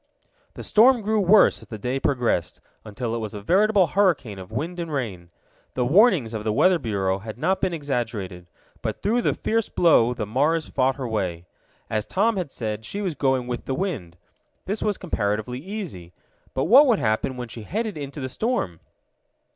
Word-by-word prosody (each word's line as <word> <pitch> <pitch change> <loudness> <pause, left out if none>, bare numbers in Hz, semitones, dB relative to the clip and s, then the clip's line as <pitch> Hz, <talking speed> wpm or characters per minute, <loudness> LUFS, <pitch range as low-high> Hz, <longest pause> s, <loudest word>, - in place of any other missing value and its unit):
The - - -7
storm 240 +3 +5
grew 215 +1 +1
worse 200 +3 +5
as - - -14
the 110 - -7
day 125 +6 -2
progressed, 120 -11 0 0.2
until 115 +2 -4
it 115 - -2
was 110 -1 -5
a - - -5
veritable 200 - +4
hurricane 155 - +1
of 95 -1 -10
wind 175 +3 -4
and 165 -2 -4
rain. 100 - -4 0.5
The 125 - +1
warnings 165 - +4
of 110 -1 -4
the 110 - 0
Weather 180 +10 +4
Bureau 100 -6 -1
had 110 +2 -8
not 185 +8 0
been 190 - +1
exaggerated. 115 - -4 0.3
But - - -4
through 235 +4 +2
the - - +1
fierce 225 -1 -1
blow 125 -8 +4
the 110 - -3
Mars 145 +9 +1
fought 130 0 +1
her 135 -3 -4
way. 90 -6 -3 0.4
As 110 -1 -2
Tom 220 +4 +1
had 180 -7 -3
said, 110 -2 -4
she 200 - -5
was 190 -5 -2
going 130 -3 0
with 120 -1 -5
the 135 - -2
wind. 125 - -4 0.5
This 205 +3 -3
was 210 -2 0
comparatively 110 - -2
easy. 160 - -7 0.4
But 130 - +1
what 275 +6 +7
would 235 -5 +4
happen 115 +2 -1
when 125 -1 -5
she 115 0 -9
headed 215 - -3
into 145 0 -6
the 130 - -3
storm? 130 - -2
130 Hz, 190 wpm, -24 LUFS, -, 0.5 s, what